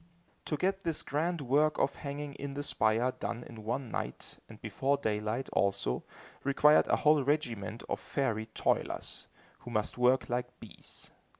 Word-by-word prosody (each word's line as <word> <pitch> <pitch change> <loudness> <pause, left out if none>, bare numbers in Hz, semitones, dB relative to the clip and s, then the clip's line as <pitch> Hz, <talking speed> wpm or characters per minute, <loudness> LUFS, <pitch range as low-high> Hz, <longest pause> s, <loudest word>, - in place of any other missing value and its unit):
To 150 - -1
get 190 +5 +1
this 165 -5 -1
grand 165 +3 0
work 145 +4 +3
of 140 - +2
hanging 145 0 -5
in 140 0 -6
the 145 - -2
spire 115 -1 +2
done 120 -1 -4
in 115 -3 -10
one 120 +2 -2
night, - - -5
and - - -12
before 140 +1 0
daylight, 110 +1 -1
also, 100 -10 +1 0.4
required 145 +2 +5
a - - +4
whole 150 -2 +4
regiment 120 -7 -1
of - - -1
fairy 115 -6 -1
toilers, 110 - -1 0.3
who - - -9
must 110 +1 -1
work 125 +2 +4
like 125 +1 -3
bees. 110 - -9
130 Hz, 160 wpm, -32 LUFS, 115-145 Hz, 0.4 s, required